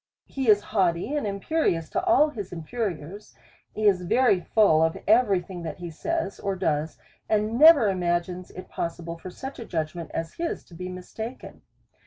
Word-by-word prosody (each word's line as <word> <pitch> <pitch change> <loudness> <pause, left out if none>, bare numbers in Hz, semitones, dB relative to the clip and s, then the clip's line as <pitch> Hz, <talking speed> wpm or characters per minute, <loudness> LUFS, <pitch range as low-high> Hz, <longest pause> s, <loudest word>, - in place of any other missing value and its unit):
He 265 -4 -2
is 205 -1 +6
haughty 185 +3 0
and 290 -7 -1
imperious 200 - 0
to - - -1
all 340 -4 +4
his 205 -9 -7
inferiors, 180 +1 -5 0.4
is 205 -4 +3
very 200 +2 +3
full 180 -5 +3
of 160 0 +1
every 210 -4 +4
thing 175 0 -8
that 160 -3 -6
he 175 -2 -7
says 265 - -3
or 195 -1 -2
does, 160 -4 -1 0.3
and 215 +2 +1
never 305 -7 +8
ima 175 -3 +1
gines 180 +1 -9
it 185 - -10
possible 170 0 -5
for 185 - -8
such 265 +9 -8
a 230 - -6
judgment 165 -2 -4
as 165 0 -4
his 335 0 -3
to - - -19
be 180 +2 -6
mis 180 0 -9
taken. 225 +3 -7
190 Hz, 180 wpm, -26 LUFS, 170-225 Hz, 0.4 s, never